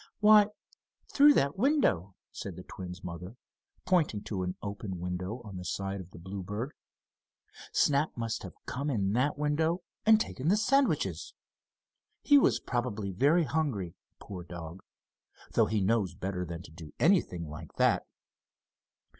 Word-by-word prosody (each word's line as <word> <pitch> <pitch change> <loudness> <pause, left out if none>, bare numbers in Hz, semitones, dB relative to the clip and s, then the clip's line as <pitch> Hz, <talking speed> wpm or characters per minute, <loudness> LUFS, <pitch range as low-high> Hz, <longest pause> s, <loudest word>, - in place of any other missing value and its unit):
"Why, 210 -1 +7 0.7
through 290 +1 +7
that 140 +7 +1
window," 150 - +2 0.2
said 95 -4 -6
the 90 - -9
twins' 90 -1 -8
mother, 90 +6 -7 0.5
pointing 165 - +2
to 95 -4 -3
an 90 0 -2
open 100 -2 -5
window 90 +6 -4
on 100 -3 -8
the 90 - -6
side 95 +2 -3
of 90 - -12
the - - -13
Bluebird. 100 - -5 1.0
"Snap 145 0 +2
must 115 0 -2
have - - -9
come 140 +3 -3
in 100 -7 0
that 130 +6 +1
window, 160 +4 0 0.2
and 220 0 +6
taken 145 -9 -3
the 195 +5 +4
sandwiches. 275 +5 +1 0.9
He 285 -1 +7
was - - +3
probably 115 -5 -2
very 145 - +3
hungry, 130 - -1 0.2
poor 90 -3 -8
dog, 85 +1 -8 0.7
though - - +3
he 110 -1 0
knows 100 -2 +1
better 90 -1 -3
than 85 0 -6
to - - -13
do 80 -2 -11
anything 145 - +2
like 75 0 -9
that." - - +2
105 Hz, 145 wpm, -30 LUFS, 90-150 Hz, 1.0 s, Why